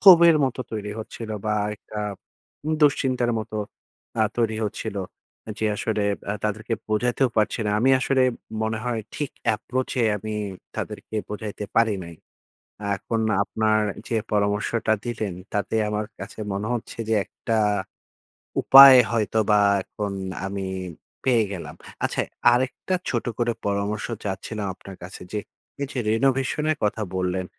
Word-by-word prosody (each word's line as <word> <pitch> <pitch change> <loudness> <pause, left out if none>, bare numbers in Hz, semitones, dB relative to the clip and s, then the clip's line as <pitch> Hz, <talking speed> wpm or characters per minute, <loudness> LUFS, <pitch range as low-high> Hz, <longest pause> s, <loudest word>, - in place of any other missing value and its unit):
ক্ষোভের 170 -4 +9
মতো 130 -1 -2
তৈরি 105 -1 -3
হচ্ছিল। 110 0 -7
বা 105 0 +1 0.2
একটা 105 0 -9 0.7
উম 155 - +1
দুশ্চিন্তার 130 -4 +3
মতো 110 0 -5 0.6
আ - - +6
তৈরি 115 -2 +1
হচ্ছিল। 105 0 -4 0.5
এ - - -3
যে 110 - +1
আসলে 110 0 -1 0.3
আ - - +1
তাদেরকে 110 +2 -1
বোঝাতেও 120 +4 +2
পারছি 110 +2 +2
না। - - +1
আমি 130 +3 +4
আসলে 130 +1 +3 0.4
মনে 110 0 -1
হয় 120 -2 -1
ঠিক 145 -3 -2 0.2
এপ্রোচ 130 +4 -3
এ - - +4
আমি 110 +2 -5 0.4
তাদেরকে - - -5
বোঝাইতে 105 0 -5
পারি 115 -2 +4
নাই। 85 0 -9 0.8
এখন 115 +3 -2 0.2
আপনার 110 +1 +1 0.3
যে 115 - -1 0.2
পরামর্শটা 105 +2 +1
দিলেন 110 -5 -2 0.2
তাতে 105 +1 -1
আমার 105 0 -1
কাছে 100 +3 -8
মনে 100 +2 -2
হচ্ছে 120 - -5
যে - - +3
একটা 115 - -3 1.1
উপায় 135 -1 +11
হয়তো 110 -1 0
বা 105 - +6 0.2
এখন 100 0 -4 0.3
আমি 95 0 -3 0.6
পেয়ে 120 -4 +4
গেলাম। 95 -4 -6 0.3
আচ্ছা - - +1 0.3
আরেকটা 130 +9 0 0.2
ছোট 120 - -1
করে 120 -1 +1
পরামর্শ 100 +1 -1 0.2
চাচ্ছিলাম 100 +1 -3
আপনার 95 +1 -11
কাছে 90 - -9
যে, 105 - -1 0.4
এই 140 - -1
যে 130 - -2
রিনোভেশন 135 +5 +1
এর 155 - -1
কথা 105 +1 +1
বললেন, 90 0 -1
110 Hz, 145 wpm, -24 LUFS, 105-120 Hz, 1.1 s, উপায়